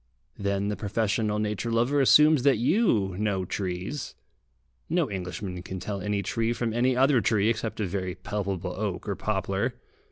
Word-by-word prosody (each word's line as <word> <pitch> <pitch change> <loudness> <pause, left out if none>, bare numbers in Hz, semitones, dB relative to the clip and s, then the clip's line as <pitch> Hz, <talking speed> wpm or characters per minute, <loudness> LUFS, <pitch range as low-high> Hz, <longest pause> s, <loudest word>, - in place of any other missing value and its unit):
Then 100 0 0
the 105 - -1
professional 105 0 0
nature 105 +2 -2
lover 120 +5 +2
assumes 150 +2 +6
that 135 -1 +4
you 115 - +2
know 100 -3 0
trees. 95 +9 -4 0.7
No - - +1
Englishman 90 0 -5
can 95 +1 -6
tell 100 +2 -4
any 100 +1 -1
tree 115 +4 0
from 115 -2 -2
any 125 +2 +2
other 135 -1 +4
tree, 105 +1 +2
except 110 -1 -2
a 105 - 0
very 95 -1 -3
palpable 95 -2 -3
oak 100 -2 -3
or 100 - -1
poplar. 95 +4 -1
105 Hz, 160 wpm, -27 LUFS, 95-115 Hz, 0.7 s, assumes